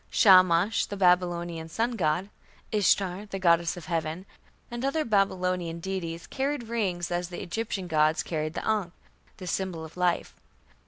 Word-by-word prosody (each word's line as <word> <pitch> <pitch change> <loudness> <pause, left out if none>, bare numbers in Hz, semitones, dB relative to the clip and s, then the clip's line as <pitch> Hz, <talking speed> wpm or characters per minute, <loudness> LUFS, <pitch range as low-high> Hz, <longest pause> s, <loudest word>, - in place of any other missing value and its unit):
Shamash, 185 0 +5
the 205 - -6
Babylonian 175 -3 +1
sun 230 +8 0
god; 185 -2 0 0.4
Ishtar, 200 -1 +1
the 195 - -5
goddess 170 -2 +2
of 170 - -9
heaven; 165 +2 -3 0.5
and 240 +1 -5
other 290 +3 0
Babylonian 185 -5 0
deities 170 -2 -4
carried 275 -1 -2
rings 185 -7 -1
as 175 0 -2
the 175 - -6
Egyptian 200 0 -3
gods 155 -1 +2
carried 155 -1 -3
the - - -4
ankh, 210 -5 0 0.4
the 185 - -8
symbol 180 -2 -3
of 160 - -13
life. 180 -1 0
180 Hz, 150 wpm, -27 LUFS, 170-200 Hz, 0.5 s, Shamash